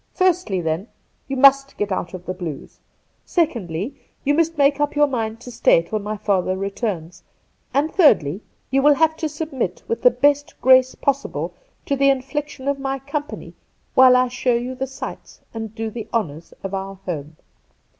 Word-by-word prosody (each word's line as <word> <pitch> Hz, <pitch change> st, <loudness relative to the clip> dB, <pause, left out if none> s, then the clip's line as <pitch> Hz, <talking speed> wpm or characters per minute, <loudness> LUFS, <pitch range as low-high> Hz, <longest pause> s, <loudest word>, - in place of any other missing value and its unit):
Firstly, 360 Hz, -, +1 dB
then, 165 Hz, +5 st, -2 dB, 0.4 s
you 270 Hz, -1 st, -3 dB
must 275 Hz, +1 st, +5 dB
get 205 Hz, -1 st, -2 dB
out 185 Hz, -1 st, -3 dB
of 180 Hz, -1 st, -10 dB
the 185 Hz, -, -3 dB
blues. 170 Hz, -6 st, -7 dB, 0.4 s
Secondly, 235 Hz, -, -1 dB, 0.3 s
you 290 Hz, -, +2 dB
must 330 Hz, +1 st, +1 dB
make 285 Hz, 0 st, +3 dB
up 290 Hz, 0 st, 0 dB
your 295 Hz, 0 st, +5 dB
mind 225 Hz, -5 st, -3 dB
to 245 Hz, -, -9 dB
stay 165 Hz, -7 st, +4 dB
till 215 Hz, +6 st, -3 dB
my 210 Hz, +1 st, -4 dB
father 190 Hz, -3 st, 0 dB
returns; 195 Hz, -4 st, -4 dB, 0.5 s
and 295 Hz, +3 st, 0 dB
thirdly, 200 Hz, -, +4 dB, 0.3 s
you 270 Hz, +1 st, +3 dB
will 295 Hz, +1 st, +6 dB
have 320 Hz, +1 st, +3 dB
to 315 Hz, -2 st, -2 dB
submit 285 Hz, -, -4 dB
with 230 Hz, -, -2 dB
the 250 Hz, -, +7 dB
best 290 Hz, +4 st, +1 dB
grace 260 Hz, 0 st, +5 dB
possible 280 Hz, 0 st, -2 dB, 0.3 s
to 280 Hz, -, 0 dB
the 275 Hz, 0 st, +4 dB
infliction 275 Hz, +1 st, -2 dB
of 280 Hz, 0 st, 0 dB
my 270 Hz, 0 st, -2 dB
company 290 Hz, +2 st, -6 dB, 0.4 s
while 255 Hz, -1 st, +7 dB
I 255 Hz, 0 st, +4 dB
show 250 Hz, 0 st, 0 dB
you 245 Hz, +2 st, -2 dB
the 260 Hz, +1 st, -3 dB
sights 265 Hz, +1 st, -8 dB
and 225 Hz, -1 st, -6 dB
do 225 Hz, -1 st, -3 dB
the 220 Hz, -1 st, -6 dB
honours 165 Hz, -8 st, -3 dB
of 195 Hz, 0 st, -5 dB
our 195 Hz, 0 st, -4 dB
home.' 155 Hz, -3 st, -5 dB
250 Hz, 175 wpm, -21 LUFS, 195-280 Hz, 0.5 s, the